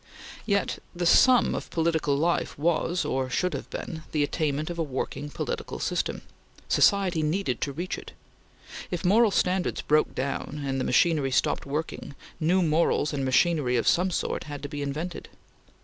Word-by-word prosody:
Yet 200 -2 0 0.2
the 175 0 -2
sum 250 +8 +5
of - - -5
political 160 -4 +1
life 170 +4 0
was, 170 +3 0
or 130 -1 -1
should 180 +7 0
have - - -5
been, 160 -2 -6
the 150 -2 +2
attainment 155 +1 -1
of 170 - -6
a - - +2
working 145 +1 -4
political 465 - -4
system. - - -2 0.4
Society 190 -5 +3
needed 155 - -1
to 140 - -1
reach 175 +6 -4
it. - - -12 0.8
If 175 0 -4
moral 220 +5 +5
standards 185 -1 0
broke 150 +1 +2
down, 140 +2 -3
and 135 -1 -1
machinery 150 +1 +2
stopped 130 - 0
working, 145 0 -4 0.2
new 180 +3 +2
morals 155 -2 +2
and 140 -2 -2
machinery 130 -1 +2
of 115 - 0
some 180 +2 +3
sort 180 - -2
had 145 -1 -7
to 145 - -5
be 145 0 -5
invented. 155 +5 -4
160 Hz, 165 wpm, -26 LUFS, 140-175 Hz, 0.8 s, sum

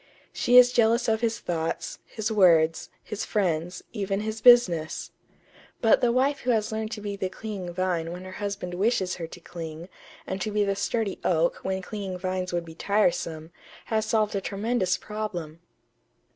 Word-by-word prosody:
She 245 +1 +4
is 250 0 +8
jealous 235 0 +3
of 220 0 +1
his 230 -1 0
thoughts, 165 -5 -3
his 220 0 -3
words, 165 -6 +4
his 210 -1 -5
friends, 180 -3 -1
even 200 -2 -2
his 220 0 -4
business.... 205 -10 +5 0.7
But 225 - +4
the 245 - +3
wife 270 +3 +2
who 250 - -4
has 220 -3 +1
learned 220 0 -3
to 215 - -6
be 205 -1 -4
the 190 -1 -2
clinging 190 -2 -6
vine 175 -2 -1
when 180 +1 -7
her 185 - -8
husband 200 -3 -3
wishes 190 -1 0
her 165 -2 -5
to 175 - -11
cling, 165 0 -8 0.4
and 190 0 -4
to 215 - -1
be 210 0 +1
the 200 -1 0
sturdy 220 -1 -1
oak 170 -1 +1
when 190 0 -2
clinging 195 -2 -5
vines 185 0 -3
would 175 -1 -2
be 165 - -10
tiresome, 170 -4 0 0.3
has 220 -1 0
solved 215 -2 +1
a 195 - 0
tremendous 200 -2 0
problem." 180 -7 -5
195 Hz, 175 wpm, -26 LUFS, 175-220 Hz, 0.7 s, is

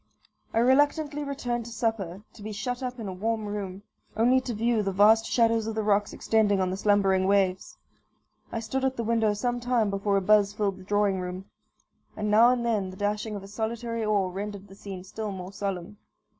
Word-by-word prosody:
I - - -3
reluctantly 290 +4 +3
returned 250 -4 -3
to 235 - -8
supper, 215 -5 -2
to 215 - -14
be 215 +1 -6
shut 245 +5 -4
up 250 -1 -4
in 220 - -5
a 190 - -4
warm 220 +3 -2
room, 200 -2 -5 0.3
only 250 +3 +4
to 255 - -5
view 230 +1 +1
the 195 -1 -1
vast 215 +3 +5
shadows 230 -2 +2
of 225 - -3
the 220 - -1
rocks 205 0 +2
extending 210 -3 +2
on 185 -1 0
the - - -2
slumbering 195 -2 +3
waves. 190 -2 +1 0.7
I 230 - -3
stood 260 +4 -3
at 265 0 0
the 230 - -1
window 225 -2 +1
some 245 +3 -1
time 240 -4 +1
before 200 0 +1
a - - +1
buzz 205 +1 +4
filled 200 -2 -1
the - - -11
drawing 205 -1 +1
room, 185 +1 -6 0.7
and 210 0 -1
now 225 +3 +7
and 245 -1 +1
then 210 -5 0
the 185 - -10
dashing 210 +1 -2
of 200 - -6
a - - -10
solitary 230 +2 -3
oar 205 -3 +1
rendered 200 +1 -6
the 195 - -13
scene 195 -2 -8
still 210 +2 -5
more 185 0 -7
solemn. 200 0 -4
210 Hz, 210 wpm, -27 LUFS, 195-230 Hz, 0.7 s, now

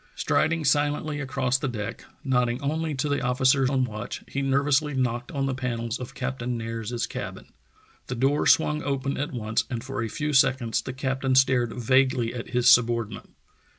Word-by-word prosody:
Striding 160 -1 +1
silently 145 +1 +1
across 130 -2 0
the 135 - -2
deck, 105 -5 -5 0.2
nodding 125 -2 +1
only 155 +1 -1
to 130 +3 -1
the 145 0 0
officer 130 +1 +2
on 130 -1 +2
watch, 105 -4 -5
he 140 - -3
nervously 140 +2 +1
knocked 125 -1 -1
on 140 -3 -1
the 135 - -1
panels 120 -2 -3
of 125 - -8
Captain 125 -2 -3
Nares's 115 +1 -3
cabin. - - -7 0.5
The 125 - -3
door 135 +4 +1
swung 150 -1 +4
open 140 -1 -2
at 145 +4 -3
once 110 -2 -1
and 120 -2 -4
for 135 -2 -4
a 115 - -2
few 150 +6 -3
seconds 130 -4 +3
the 130 - -6
captain 130 0 -1
stared 130 -3 +3
vaguely 125 -1 +2
at 120 -1 -6
his 125 -1 +1
subordinate. 115 -3 +3
130 Hz, 175 wpm, -26 LUFS, 120-140 Hz, 0.5 s, swung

